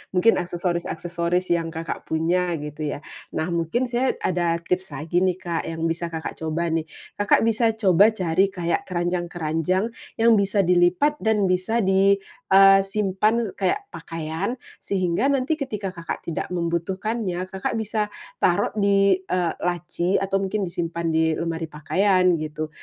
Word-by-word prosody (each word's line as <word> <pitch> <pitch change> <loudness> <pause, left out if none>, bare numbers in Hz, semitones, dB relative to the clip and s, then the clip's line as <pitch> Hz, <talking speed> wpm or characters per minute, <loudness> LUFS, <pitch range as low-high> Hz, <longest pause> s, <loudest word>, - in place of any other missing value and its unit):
mungkin 225 +6 +5
aksesoris-aksesoris 175 0 -2
yang 165 -1 +1
Kakak 165 0 -5
punya, 170 +2 +1
gitu 150 +1 -5
ya. - - -8 0.4
Nah, 160 - -1
mungkin 170 +10 0
saya 245 +2 0
ada 170 -2 +1
tips 180 +1 -2
lagi 160 +5 0
nih 185 -1 +1
Kak 170 -2 -3
yang 165 0 -4
bisa 170 +1 -3
Kakak 160 -1 -5
coba 160 +2 -1
nih. 160 -1 -1 0.3
Kakak 205 - +4
bisa 230 0 +3
coba 205 0 +5
cari 185 0 +2
kayak 175 -3 -1
keranjang-keranjang 175 0 -1 0.3
yang 230 +1 +5
bisa 200 0 +2
dilipat 180 - +3
dan 210 -3 +2
bisa 195 +6 +1
di, 195 +1 +4 0.4
eee, 195 0 +8
simpan 210 +2 +1
kaya 190 - +2 0.2
pakaian, 165 +7 -4 0.2
sehingga 185 +4 0
nanti 280 +3 +1
ketika 210 -8 -3
Kakak 170 -2 -6
tidak 165 - -3
membutuhkannya, 180 +3 -2
Kakak 190 +3 -2
bisa 215 -1 -1 0.3
taruh 175 - +2
di, 200 -1 +4
eee, 180 -2 -1
laci 175 +1 -1
atau 195 0 0
mungkin 195 +1 -1
disimpan 170 -1 -3
di 160 0 +2
lemari 165 0 -3
pakaian, 180 +4 +2
gitu. 155 0 -4
180 Hz, 145 wpm, -23 LUFS, 170-200 Hz, 0.4 s, eee